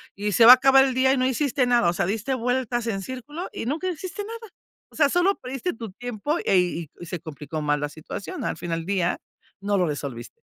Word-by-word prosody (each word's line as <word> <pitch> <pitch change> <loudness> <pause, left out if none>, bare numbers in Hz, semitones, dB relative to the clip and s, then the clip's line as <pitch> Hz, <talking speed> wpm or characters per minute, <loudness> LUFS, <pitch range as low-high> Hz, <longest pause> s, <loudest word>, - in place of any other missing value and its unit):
y 205 +1 -2
se 230 - +5
va 245 - +13
a - - +9
acabar 270 +1 +5
el 265 - -1
día, 260 +1 +3
y 270 - 0
no 255 - +1
hiciste 265 0 +1
nada. 240 -8 +3
O - - 0
sea, 175 - 0
diste 220 +7 -2
vueltas 245 -1 -1
en 195 -3 -2
círculo, 275 - -7
y - - -5
nunca 320 +8 -2
hiciste 365 +4 -5
nada. 450 -1 -9 0.4
O - - -20
sea, 285 -2 +4
solo 360 +5 +2
perdiste 270 +7 -4
tu 225 -3 -8
tiempo, 245 - -3
eh 195 - +4
y 170 -3 0
y 175 - -9
se 180 +1 -4
complicó 155 0 -6
mal 145 -1 0
la 145 - -2
situación. 160 +5 -7
Al - - -1
fin 175 - -6
al 165 0 -2
día, 185 -2 0 0.4
no 205 +1 -1
lo 180 -2 +2
resolviste. 140 -5 -5
235 Hz, 240 wpm, -24 LUFS, 175-270 Hz, 0.4 s, va